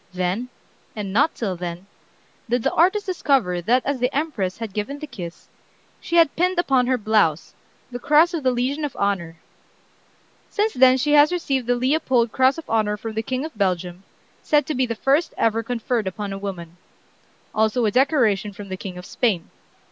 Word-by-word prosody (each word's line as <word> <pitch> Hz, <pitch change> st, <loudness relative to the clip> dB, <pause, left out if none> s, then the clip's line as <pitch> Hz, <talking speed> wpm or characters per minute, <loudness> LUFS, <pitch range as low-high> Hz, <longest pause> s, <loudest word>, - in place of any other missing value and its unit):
Then, 185 Hz, +7 st, -2 dB, 0.5 s
and 200 Hz, -3 st, -5 dB
not 285 Hz, +9 st, +2 dB
till 195 Hz, -6 st, -3 dB
then, 175 Hz, +1 st, -6 dB, 0.6 s
did 245 Hz, -1 st, 0 dB
the -, -, 0 dB
artist 380 Hz, +5 st, +3 dB
discover 270 Hz, -, +1 dB
that 245 Hz, +8 st, +1 dB
as 280 Hz, -2 st, -1 dB
the 250 Hz, +2 st, 0 dB
Empress 265 Hz, -, -2 dB
had 225 Hz, -4 st, -6 dB
given 215 Hz, +8 st, -3 dB
the 305 Hz, -, -7 dB
kiss, 180 Hz, -, -9 dB, 0.5 s
she 340 Hz, -, -4 dB
had 335 Hz, -4 st, +4 dB
pinned 365 Hz, +2 st, +1 dB
upon 265 Hz, -7 st, +2 dB
her 255 Hz, 0 st, +2 dB
blouse 210 Hz, -8 st, +1 dB, 0.4 s
the 245 Hz, -, -5 dB
Cross 305 Hz, +7 st, +4 dB
of 330 Hz, -, -2 dB
the 260 Hz, -, +2 dB
Legion 255 Hz, +5 st, -1 dB
of 290 Hz, -4 st, -3 dB
Honor." 185 Hz, -5 st, -1 dB, 1.1 s
Since 425 Hz, +1 st, 0 dB
then 255 Hz, 0 st, +5 dB
she 295 Hz, +3 st, 0 dB
has 295 Hz, +1 st, +6 dB
received 275 Hz, -8 st, -1 dB
the 245 Hz, -, +2 dB
Leopold 255 Hz, -3 st, +1 dB
Cross 260 Hz, +4 st, +3 dB
of 330 Hz, -, -9 dB
Honor 215 Hz, -2 st, 0 dB
from 220 Hz, +1 st, -6 dB
the 220 Hz, -, -1 dB
King 260 Hz, +5 st, -3 dB
of 315 Hz, -, -9 dB
Belgium, 180 Hz, -3 st, -1 dB, 0.4 s
said 295 Hz, -2 st, +2 dB
to 310 Hz, -, -3 dB
be 255 Hz, -2 st, 0 dB
the 230 Hz, -, -3 dB
first 275 Hz, +8 st, +1 dB
ever 225 Hz, 0 st, +1 dB
conferred 230 Hz, -2 st, -2 dB
upon 200 Hz, +1 st, -4 dB
a -, -, -5 dB
woman; 175 Hz, -4 st, -7 dB, 0.8 s
also 220 Hz, +2 st, +1 dB
a 210 Hz, -, +2 dB
decoration 225 Hz, -6 st, +2 dB
from 200 Hz, 0 st, -10 dB
the 190 Hz, -, -4 dB
King 185 Hz, -1 st, -7 dB
of 180 Hz, -, -9 dB
Spain. 205 Hz, -9 st, -1 dB
240 Hz, 190 wpm, -22 LUFS, 200-280 Hz, 1.1 s, has